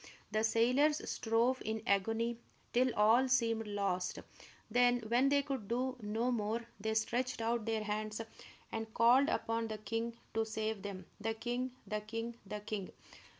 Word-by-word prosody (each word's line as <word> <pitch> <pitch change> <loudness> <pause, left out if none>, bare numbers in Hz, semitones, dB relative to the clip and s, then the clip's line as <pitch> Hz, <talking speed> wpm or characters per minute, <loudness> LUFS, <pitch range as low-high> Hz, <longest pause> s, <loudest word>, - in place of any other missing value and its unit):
The 215 +1 +1
sailors 255 +7 +3
strove 235 +3 +1
in 220 0 -3
agony 225 +4 +1 0.3
till 250 +1 +4
all 225 +5 +5
seemed 230 -3 +2
lost. 195 -3 -1 0.5
Then, 245 0 +4
when 240 +5 +3
they 285 0 +3
could 270 -7 -4
do 255 +3 0
no 220 +4 0
more, 225 0 -1
they 220 +1 -1
stretched 245 +3 0
out 230 -1 0
their 225 -1 0
hands 215 +1 -2 0.5
and 225 0 -4
called 250 +5 +6
upon 230 -5 0
the 215 -1 -4
king 230 +2 -3 0.2
to 225 - +2
save 220 -1 -2
them, 190 -2 -6
the 225 +1 -1
king, 245 +3 -2
the 215 -1 -2
king, 225 +2 -4
the 210 +1 -5
king! 205 -2 -4
225 Hz, 155 wpm, -35 LUFS, 215-245 Hz, 0.5 s, called